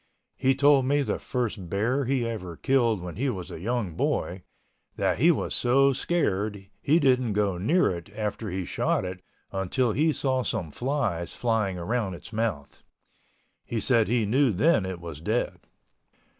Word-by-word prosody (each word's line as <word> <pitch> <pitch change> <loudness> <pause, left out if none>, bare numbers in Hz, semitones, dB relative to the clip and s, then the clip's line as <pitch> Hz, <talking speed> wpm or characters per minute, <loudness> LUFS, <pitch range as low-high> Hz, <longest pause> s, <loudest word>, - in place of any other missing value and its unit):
He 135 0 +2
told 140 -1 +5
me 145 +2 +2
the - - -2
first 110 -8 -3
bear 120 +9 0
he 125 -2 0
ever 90 -8 -5
killed 120 -7 +2
when 90 -1 -7
he 135 +4 0
was 95 -8 -5
a - - -7
young 110 -2 -2
boy, 90 +3 -1 0.5
that - - 0
he - - +5
was - - +1
so 135 +3 +4
scared 105 - -1
he 155 +4 +3
didn't 130 -6 +2
go 100 -3 0
near 165 - +3
it 85 -2 -6
after 105 0 -3
he 95 0 -3
shot 95 - 0
it 90 0 -6 0.3
until 100 +6 0
he 155 +8 +2
saw 130 -3 0
some 85 -9 -3
flies 120 - -2
flying 110 -6 0
around 100 +1 -2
its 85 +7 -12
mouth. 105 -11 -3 0.8
He 115 - -3
said, 115 0 +3
he 115 -1 +1
knew 130 +4 +3
then 105 - +2
it 95 -2 -5
was 85 -3 -8
dead. 110 +8 -1
110 Hz, 170 wpm, -26 LUFS, 95-130 Hz, 0.8 s, told